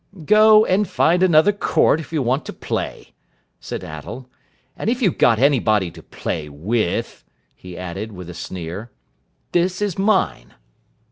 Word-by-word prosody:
"Go 215 Hz, +3 st, +6 dB
and 200 Hz, +2 st, +1 dB
find 175 Hz, +3 st, +2 dB
another 180 Hz, +1 st, +5 dB
court, 200 Hz, -5 st, +2 dB
if 160 Hz, -, -9 dB
you 155 Hz, -4 st, 0 dB
want 130 Hz, +5 st, 0 dB
to -, -, -6 dB
play," -, -, -5 dB, 0.5 s
said -, -, -6 dB
Attell, 100 Hz, -, -8 dB, 0.5 s
"and 215 Hz, -, -2 dB
if 245 Hz, +1 st, 0 dB
you've 200 Hz, -, 0 dB
got 115 Hz, -, +5 dB
anybody 110 Hz, -, +2 dB
to -, -, -13 dB
play 75 Hz, -1 st, -5 dB
with," 85 Hz, -, -2 dB, 0.3 s
he 90 Hz, -1 st, -11 dB
added 95 Hz, +4 st, -6 dB
with 90 Hz, -3 st, -9 dB
a 90 Hz, -, -8 dB
sneer. 90 Hz, +5 st, -7 dB, 0.6 s
"This 175 Hz, +1 st, +1 dB
is 205 Hz, -3 st, -2 dB
mine." 195 Hz, -, 0 dB
130 Hz, 150 wpm, -20 LUFS, -, 0.6 s, Go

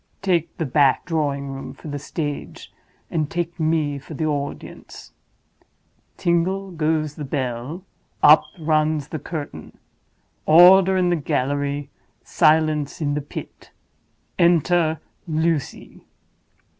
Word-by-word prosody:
Take 175 Hz, -4 st, 0 dB
the 160 Hz, -, -2 dB
back 140 Hz, 0 st, +2 dB
drawing 140 Hz, -4 st, -2 dB
room 135 Hz, 0 st, -7 dB
for -, -, -12 dB
the 145 Hz, -1 st, -4 dB
stage, 145 Hz, 0 st, -6 dB, 0.4 s
and 155 Hz, -3 st, -1 dB
take 170 Hz, 0 st, -4 dB
me 155 Hz, -3 st, 0 dB
for 150 Hz, +3 st, -10 dB
the 155 Hz, -, -2 dB
audience. 145 Hz, -2 st, -5 dB, 1.1 s
Tingle 185 Hz, +3 st, 0 dB
goes 155 Hz, -2 st, -1 dB
the 150 Hz, -, -7 dB
bell; 135 Hz, +4 st, -4 dB, 0.4 s
up 150 Hz, +1 st, +7 dB
runs 155 Hz, -2 st, 0 dB
the 155 Hz, -, -5 dB
curtain; 145 Hz, -, -7 dB, 0.7 s
order 185 Hz, +3 st, +7 dB
in 180 Hz, -1 st, +2 dB
the -, -, +3 dB
gallery, 140 Hz, -1 st, -2 dB, 0.3 s
silence 155 Hz, -2 st, +2 dB
in 145 Hz, -3 st, -1 dB
the 150 Hz, -, -2 dB
pit—enter 165 Hz, +2 st, -2 dB, 0.3 s
Lucy!" 160 Hz, -2 st, -2 dB
155 Hz, 110 wpm, -22 LUFS, 145-170 Hz, 1.1 s, up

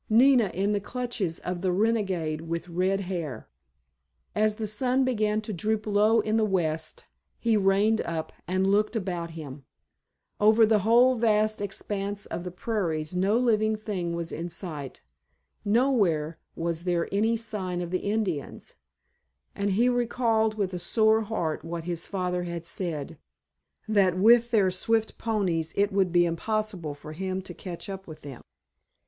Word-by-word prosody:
Nina 240 Hz, -1 st, +5 dB
in 200 Hz, +3 st, +1 dB
the 205 Hz, -, +1 dB
clutches 235 Hz, -6 st, -3 dB
of 180 Hz, -1 st, -4 dB
the 185 Hz, -1 st, +1 dB
renegade 185 Hz, -6 st, 0 dB
with 170 Hz, +1 st, -4 dB
red 185 Hz, +3 st, 0 dB
hair! 170 Hz, -, -5 dB, 0.9 s
As 215 Hz, 0 st, +2 dB
the 220 Hz, 0 st, -3 dB
sun 250 Hz, +5 st, +1 dB
began 215 Hz, -4 st, +1 dB
to 215 Hz, 0 st, -5 dB
droop 215 Hz, +4 st, -1 dB
low 215 Hz, +2 st, +4 dB
in 215 Hz, +1 st, 0 dB
the 220 Hz, -, +3 dB
west 160 Hz, -6 st, -1 dB, 0.3 s
he 230 Hz, -2 st, +1 dB
reined 205 Hz, +2 st, +3 dB
up 160 Hz, -1 st, -4 dB
and 185 Hz, +2 st, +1 dB
looked 210 Hz, +4 st, +2 dB
about 180 Hz, -5 st, -2 dB
him. 140 Hz, -3 st, -8 dB, 0.8 s
Over 220 Hz, +2 st, +6 dB
the 215 Hz, -1 st, +3 dB
whole 235 Hz, +5 st, +5 dB
vast 215 Hz, -1 st, +2 dB
expanse 200 Hz, 0 st, -3 dB
of 170 Hz, -, -5 dB
the 180 Hz, -, -4 dB
prairies 175 Hz, -5 st, -2 dB
no 195 Hz, +5 st, +2 dB
living 220 Hz, -3 st, +2 dB
thing 190 Hz, -6 st, -3 dB
was 170 Hz, -1 st, -4 dB
in 170 Hz, +2 st, -4 dB
sight. 155 Hz, -6 st, -7 dB, 0.6 s
Nowhere 200 Hz, -, +2 dB, 0.2 s
was 170 Hz, +1 st, -3 dB
there 175 Hz, -2 st, +1 dB
any 220 Hz, +3 st, +2 dB
sign 205 Hz, -6 st, -4 dB
of 175 Hz, -1 st, -4 dB
the 185 Hz, -, 0 dB
Indians, 200 Hz, -8 st, -3 dB, 0.8 s
and 200 Hz, 0 st, -1 dB
he 220 Hz, +6 st, +3 dB
recalled 230 Hz, -3 st, +1 dB
with 195 Hz, -3 st, -2 dB
a 180 Hz, -, -3 dB
sore 220 Hz, +4 st, +3 dB
heart 175 Hz, -9 st, -2 dB
what 165 Hz, 0 st, -5 dB
his 170 Hz, -1 st, -3 dB
father 180 Hz, -2 st, -2 dB
had 170 Hz, -1 st, -5 dB
said, 165 Hz, -5 st, -3 dB, 0.7 s
that 195 Hz, -4 st, +3 dB
with 235 Hz, +4 st, +6 dB
their 205 Hz, -5 st, +3 dB
swift 220 Hz, +4 st, 0 dB
ponies 180 Hz, -8 st, -1 dB
it 200 Hz, +1 st, +3 dB
would 195 Hz, -2 st, +2 dB
be 175 Hz, 0 st, +4 dB
impossible 180 Hz, -2 st, -2 dB
for 150 Hz, +1 st, -10 dB
him 185 Hz, +3 st, -3 dB
to 180 Hz, -, -8 dB
catch 175 Hz, 0 st, -7 dB
up 195 Hz, -1 st, -7 dB
with 155 Hz, -1 st, -10 dB
them. 140 Hz, -3 st, -9 dB
195 Hz, 160 wpm, -27 LUFS, 170-220 Hz, 0.9 s, Over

